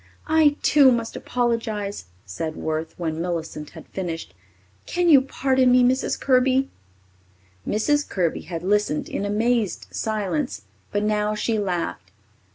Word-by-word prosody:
"I, 310 -2 +4
too, 280 -3 +6
must 230 -2 -1
apologize," 225 - -2 0.2
said 155 - -4
Worth, 160 0 -3
when 160 -2 -3
Millicent 165 -3 -4
had 160 - -10
finished. 170 -4 -5 0.5
"Can 350 -1 +1
you 280 -4 +8
pardon 260 -1 +2
me, 250 0 +6
Mrs. 260 +2 +1
Kirby?" 260 +1 +2 1.0
Mrs. 290 +7 +1
Kirby 175 -4 -1
had 170 -1 -6
listened 205 -5 +1
in 200 - -3
amazed 220 0 0
silence, 190 - -2 0.3
but 205 - 0
now 210 0 0
she 220 +1 0
laughed. 170 - -3
210 Hz, 130 wpm, -23 LUFS, 170-255 Hz, 1.0 s, you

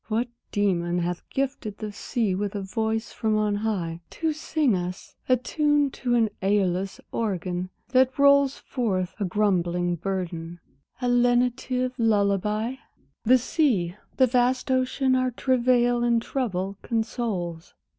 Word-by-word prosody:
What 235 +2 0 0.2
demon 175 -4 +1
hath 175 0 -3
gifted 265 -6 -3
the 215 -1 -5
sea 210 0 -1
with 200 +2 -2
a 200 - -2
voice 220 +3 -2
from 220 -1 0
on 210 -1 +1
high, 180 -6 -2
To 320 -1 -1
sing 300 -6 +1
us 180 0 -5
(attuned 290 +3 +2
to 245 -2 0
an 225 -3 +2
Æolus 190 -1 0
organ 185 -4 -2 0.2
that 260 0 +3
rolls 280 -1 +5
Forth 190 -8 -2
a 205 - 0
grumbling 175 -3 +1
burden) 175 -2 -4 0.4
a - - +2
lenitive 245 +1 +2
lullabye? 210 +2 +1 0.5
The 255 +3 +7
sea, 230 - +1 0.2
the 260 - +6
vast 250 +1 +1
ocean 260 +1 +1
our 255 0 +2
travail 245 -1 +2
and 235 -1 +3
trouble 200 -6 -2
consoles! 220 -8 -3
220 Hz, 130 wpm, -25 LUFS, 190-255 Hz, 0.5 s, The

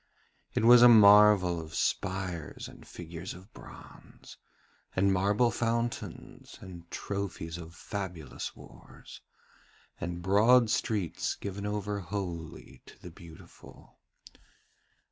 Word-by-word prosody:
It - - +1
was 120 0 +8
a 120 - +9
marvel 105 -5 +6
of 80 -1 -10
spires 95 -4 -3
and - - -15
figures 85 +2 -8
of 95 +4 -16
bronze, - - -14 0.6
and 95 +1 +2
marble 105 +6 +2
fountains, 115 0 -4
and 85 -2 -12
trophies 90 -4 -5
of 85 0 -11
fabulous 90 -7 -6
wars, - - -15 0.8
and 85 0 -5
broad 110 +5 +4
streets 105 -8 -2
given 100 +1 -6
over 105 0 -3
wholly 85 -4 -7
to - - -16
the 90 - -11
Beautiful. 85 -2 -16
95 Hz, 105 wpm, -29 LUFS, 85-105 Hz, 0.8 s, a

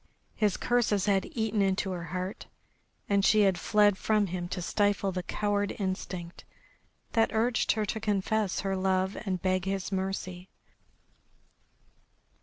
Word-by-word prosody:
His 210 -3 +1
curses 225 -5 +1
had 195 -2 +2
eaten 220 -2 0
into 190 0 +1
her 175 -2 -4
heart, 185 +3 -5 0.6
and 200 -1 +2
she 215 +1 +5
had 190 -3 +3
fled 205 +1 +3
from 215 -1 +2
him 175 -1 -4
to 185 - -3
stifle 200 +1 +1
the 185 0 -3
coward 205 +1 -1
instinct 185 -3 -4 0.7
that 225 -1 +3
urged 230 +2 +2
her 215 -1 -1
to 220 - -3
confess 210 -1 0
her 195 -1 -1
love 190 0 +1
and 185 -1 0
beg 185 -1 +1
his 195 0 -2
mercy. 190 -1 -3
195 Hz, 140 wpm, -29 LUFS, 185-210 Hz, 0.7 s, she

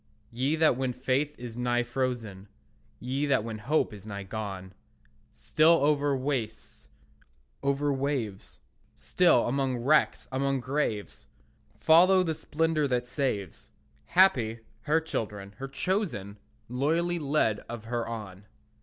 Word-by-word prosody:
Ye 130 +6 0
that 160 -5 +3
when 130 -1 -1
faith 135 +4 -1
is 120 -2 -8
nigh 120 0 +1
frozen, 120 -6 -3 0.5
Ye 135 +4 -2
that 135 -6 +2
when 110 -1 -5
hope 130 +1 0
is 105 0 -11
nigh 100 -1 -5
gone, 95 -2 -6 0.6
Still, 160 +2 +3
over 145 -2 +2
wastes, 130 -5 -4 0.7
over 140 +1 +1
waves, 135 -8 -3 0.3
Still, 175 -9 +3
among 130 0 0
wrecks, 140 +6 +2
among 135 +1 0
graves, 125 -5 -3 0.5
Follow 185 +4 +6
the 165 -3 -1
splendour 155 -1 0
that 125 -2 0
saves, 125 - -3 0.4
Happy, 120 -12 +3 0.2
her 155 +2 +3
children, 105 -10 -5
her 135 - -5
chosen, 135 - -2 0.3
Loyally 165 +8 0
led 140 -8 +1
of 120 -2 -6
her 120 +1 -3
on. 105 -4 -7
130 Hz, 125 wpm, -28 LUFS, 110-150 Hz, 0.7 s, Follow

